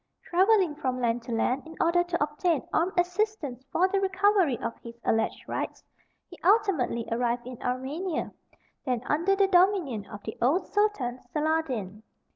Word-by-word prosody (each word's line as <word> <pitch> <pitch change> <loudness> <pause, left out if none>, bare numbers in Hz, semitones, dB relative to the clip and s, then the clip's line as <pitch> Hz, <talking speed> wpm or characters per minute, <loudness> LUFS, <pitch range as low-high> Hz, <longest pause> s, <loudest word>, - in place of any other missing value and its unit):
Travelling 375 -2 +3
from 260 -4 -2
land 240 -1 0
to 240 - -6
land 250 +4 +1
in 320 - -10
order 350 +1 +3
to 345 -2 -1
obtain 300 0 -1
armed 350 +4 +1
assistance 355 - -1
for 365 +2 +3
the 395 +1 0
recovery 385 - +3
of 230 +1 -4
his 235 0 -11
alleged 225 0 0
rights, - - -4 0.4
he 350 - -14
ultimately 360 - +2
arrived 240 +1 0
in 250 -1 -9
Armenia, 275 +8 -2 0.5
then 250 -3 -1
under 340 +6 +2
the 395 0 +4
dominion 355 - +2
of 205 0 -10
the 220 - -6
old 315 +10 +2
Sultan 410 - 0
Saladin. 275 -11 -1
305 Hz, 155 wpm, -27 LUFS, 245-370 Hz, 0.5 s, the